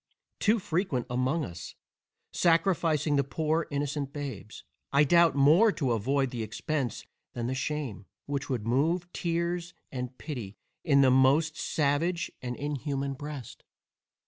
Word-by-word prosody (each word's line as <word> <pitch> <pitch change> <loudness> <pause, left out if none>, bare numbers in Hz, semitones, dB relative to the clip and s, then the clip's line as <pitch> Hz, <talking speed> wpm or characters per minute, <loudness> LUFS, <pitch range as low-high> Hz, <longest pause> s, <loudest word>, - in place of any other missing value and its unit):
too 215 +3 +3
frequent 170 - -1
among 130 +6 0
us, 85 0 -9 0.6
sacrificing 165 -4 +2
the 140 - +3
poor 155 +3 -1
innocent 145 -1 -2
babes, 140 -8 -7 0.3
I 140 +1 +5
doubt, 170 +2 +5
more 160 +11 +6
to 135 -7 -1
avoid 130 +4 +1
the 120 - -4
expence 130 +2 -3 0.3
than 120 - -3
the 125 - -1
shame, 130 -7 -3 0.2
which 145 0 -3
would 120 -6 -2
move 165 +9 +1
tears 170 +1 -2 0.2
and 125 -1 -5
pity 120 -10 -6 0.3
in 140 -4 +4
the 130 -1 +5
most 140 +5 +4
savage 160 +4 0
and 125 -1 -4
inhuman 140 -1 -3
breast. 145 -3 -8
145 Hz, 135 wpm, -29 LUFS, 130-165 Hz, 0.6 s, more